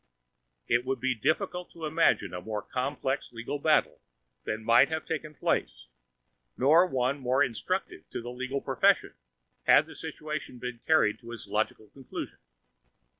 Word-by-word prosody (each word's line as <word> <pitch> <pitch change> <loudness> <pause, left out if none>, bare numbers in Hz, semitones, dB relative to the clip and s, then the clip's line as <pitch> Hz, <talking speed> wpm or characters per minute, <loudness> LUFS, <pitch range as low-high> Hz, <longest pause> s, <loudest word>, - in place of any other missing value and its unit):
It 120 +1 +2
would 130 0 -2
be 130 +1 +1
difficult 180 - -1
to 165 -1 -6
imagine 160 - +2
a 90 - -4
more 105 +1 -4
complex 135 +1 -2
legal 115 +5 -4
battle 155 +1 +2 0.4
than 110 +1 -3
might 120 +4 +6
have 160 0 -3
taken 155 -1 -4
place, - - -1 0.7
nor 160 +7 +6
one 130 -2 0
more 130 +2 +2
instructive 185 - -3
to - - -4
the 120 +1 -6
legal 130 +2 -3
profession, - - +2 0.5
had - - +6
the - - -12
situation 150 -4 -6
been 120 -1 -6
carried 110 -10 +4
to 115 -1 -10
its 120 -3 -7
logical 105 +1 -2
conclusion. 135 -2 -7
130 Hz, 150 wpm, -29 LUFS, 115-150 Hz, 0.7 s, might